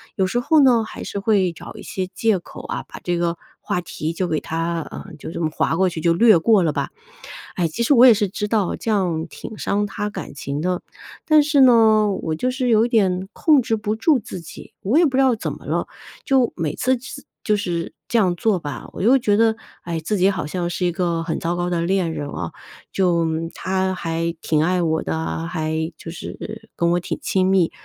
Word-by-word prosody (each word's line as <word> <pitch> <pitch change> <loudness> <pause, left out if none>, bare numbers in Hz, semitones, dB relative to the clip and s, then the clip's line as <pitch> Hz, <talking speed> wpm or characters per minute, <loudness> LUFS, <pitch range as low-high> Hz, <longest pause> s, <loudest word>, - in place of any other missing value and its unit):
有 190 - +2
时 240 +6 0
候 300 +4 +4
呢， 240 -4 +5
还 220 - -8
是 200 - -4
会 195 -4 +2
找 160 - -10
一 210 - -10
些 185 -1 -4
借 215 0 +1
口 - - -11
啊， - - -4
把 - - -10
这 175 -1 0
个 170 0 -1 0.2
话 - - -2
题 160 -2 -4
就 180 +2 -1
给 155 -3 0
它， 165 +1 -2
呃， - - -8
就 - - -7
这 - - -5
么 160 - +1
划 160 - 0
过 190 +2 +3
去 165 -2 -6
就 170 +1 +3
略 215 0 +6
过 210 +2 +4
了 155 -3 +1
吧。 - - -2 0.7
哎， 175 -2 +1
其 160 - -5
实 260 - +4
我 250 -1 +8
也 245 - +9
是 210 -1 0
知 210 +2 -3
道 210 -5 +1
这 225 - -3
样 175 -6 0
挺 220 - -9
伤 205 +1 0
他 205 +1 -3
感 205 - -7
情 140 0 -4
的， 180 +1 -1 0.4
但 310 -1 +6
是 290 -1 +3
呢， 220 -4 +6
我 160 - -2
就 250 +10 -1
是 255 0 -2
有 225 0 +4
点 190 -5 +1
控 300 -4 +4
制 225 -1 0
不 210 0 -2
住 275 +5 +3
自 185 -4 -8
己， 165 - -12
我 220 +10 +1
也 340 - +6
不 270 -4 0
知 - - +5
道 260 -2 +4
怎 215 - -4
么 - - -12
了， - - -1 0.4
就 265 -3 +3
每 155 -4 -2
次 255 +1 +1
次 275 +3 -9 0.2
就 210 - +2
是 175 -5 -3
这 235 - +2
样 185 -4 +2
做 200 0 +1
吧， 145 -4 -6
我 - - -7
又 240 +7 +5
觉 210 -5 +2
得， 225 0 +3 0.3
哎， 170 -2 -3
自 205 +7 -1
己 190 +1 +4
好 190 -5 -2
像 175 +2 -3
是 180 +1 -2
一 175 - +2
个 170 -1 -1
很 165 -1 -2
糟 170 +1 -1
糕 175 0 -1
的 170 -1 0
恋 175 -1 0
人 145 -2 -4
哦， - - -5 0.4
就 175 -3 +2 0.3
他 190 0 -1
还 165 0 -2
挺 155 -1 +1
爱 180 +2 +1
我 160 -1 +1
的 80 - -2
啊， 80 0 -3
还 160 - -2
就 165 - -8
是 220 +5 -8
跟 170 0 +1
我 175 - +2
挺 175 - -4
亲 185 -1 +1
密。 185 -3 +3
185 Hz, 250 characters per minute, -21 LUFS, 170-220 Hz, 0.7 s, 也